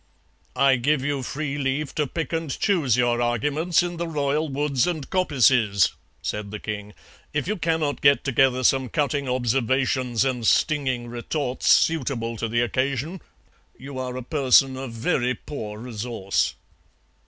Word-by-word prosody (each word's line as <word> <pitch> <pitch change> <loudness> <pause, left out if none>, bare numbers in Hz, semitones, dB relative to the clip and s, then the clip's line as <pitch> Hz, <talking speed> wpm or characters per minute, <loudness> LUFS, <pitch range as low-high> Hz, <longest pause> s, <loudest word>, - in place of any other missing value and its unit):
"'I 135 -1 +4
give 135 +2 +1
you 145 -2 -1
free 145 +2 -4
leave 135 +2 -1
to 150 -2 0
pick 165 +5 -4
and 165 -2 -2
choose 145 - +1
your 120 -1 +2
arguments 150 +9 +1
in 175 -1 -4
the 170 0 -3
royal 150 0 -1
woods 140 0 0
and 160 -6 -3
coppices,' 125 - +3 0.3
said 105 -1 -3
the 105 - -5
king; 105 -1 -6 0.4
'if 145 - -1
you 210 - 0
cannot 160 -5 -1
get 140 0 +5
together 130 -1 +2
some 130 0 +3
cutting 140 -1 -1
observations 130 0 +1
and 125 -4 -1
stinging 135 -6 +1
retorts 125 +3 -3
suitable 125 -7 +2
to 115 +1 -3
the 120 +1 +1
occasion 135 +7 -1 0.6
you 135 0 -8
are 125 -1 -4
a 130 - -5
person 135 -1 +3
of 130 -2 -6
very 125 +1 0
poor 105 -8 -7
resource.' 115 -3 -2
135 Hz, 150 wpm, -24 LUFS, 120-150 Hz, 0.6 s, get